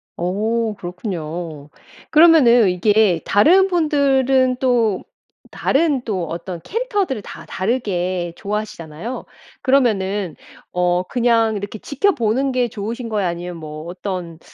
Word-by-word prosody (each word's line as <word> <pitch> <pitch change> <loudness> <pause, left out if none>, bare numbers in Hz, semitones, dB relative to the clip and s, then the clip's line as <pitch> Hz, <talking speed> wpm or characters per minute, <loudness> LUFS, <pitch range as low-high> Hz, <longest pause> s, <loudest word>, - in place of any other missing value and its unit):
어 215 +5 -1
그렇군요. 170 -5 -6 0.4
그러면은 290 - +6
이게 195 -1 +3
다른 360 - +5
분들은 270 -6 +2
또 235 -7 +1 0.5
다른 285 -2 +1
또 190 -7 -2
어떤 170 +2 -6
캐릭터들을 410 - -2
다 - - -10
다르게 185 -5 -2
좋아하시잖아요. 205 -1 -5 0.4
그러면은 205 - +1 0.4
어 180 0 +1
그냥 230 0 +2
이렇게 205 +2 -5
지켜보는 270 - 0
게 250 -1 +1
좋으신 230 +2 -5
거예요? 205 -4 0
아니면 175 0 -5
뭐 155 -1 -8
어떤 180 -2 -5
215 Hz, 270 characters per minute, -20 LUFS, 180-255 Hz, 0.5 s, 그러면은